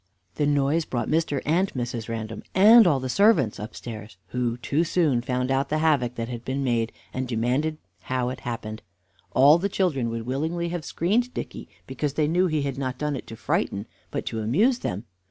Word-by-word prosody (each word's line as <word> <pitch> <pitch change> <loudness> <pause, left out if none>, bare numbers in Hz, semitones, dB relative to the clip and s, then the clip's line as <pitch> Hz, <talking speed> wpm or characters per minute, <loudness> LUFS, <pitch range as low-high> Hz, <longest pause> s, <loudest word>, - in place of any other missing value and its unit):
The 145 - 0
noise 145 +3 +2
brought 120 -2 -2
Mr. 155 -3 0
and 180 +6 +2
Mrs. 120 -2 -3
Random 110 -1 -4
and 215 +3 +8
all 145 -5 +3
the 130 - -4
servants 160 - +3
upstairs, 110 -1 -8
who 120 -1 -1
too 140 +6 0
soon 160 -7 +2
found 125 +1 -1
out 135 +1 +1
the 155 - +1
havoc 145 -6 +2
that 115 -1 -3
had 120 -1 -6
been 135 +2 -2
made, 115 -3 0 0.2
and 130 0 -2
demanded 130 +7 0 0.3
how 125 -1 -1
it 130 - -5
happened. 110 -2 -5 0.5
All 145 +5 +7
the 200 +3 -1
children 150 -12 0
would 115 0 -4
willingly 160 +7 -2
have 175 -2 -4
screened 230 +9 0
Dicky, - - -6 0.2
because 145 -2 -3
they 155 -2 +2
knew 180 +4 +2
he 155 -3 0
had 140 -1 -3
not 130 -2 -3
done 150 0 -1
it - - -7
to 115 - -8
frighten, 100 -1 -1 0.2
but - - -4
to 110 - -3
amuse 210 - +2
them. 100 +4 -4
135 Hz, 195 wpm, -25 LUFS, 120-160 Hz, 0.5 s, and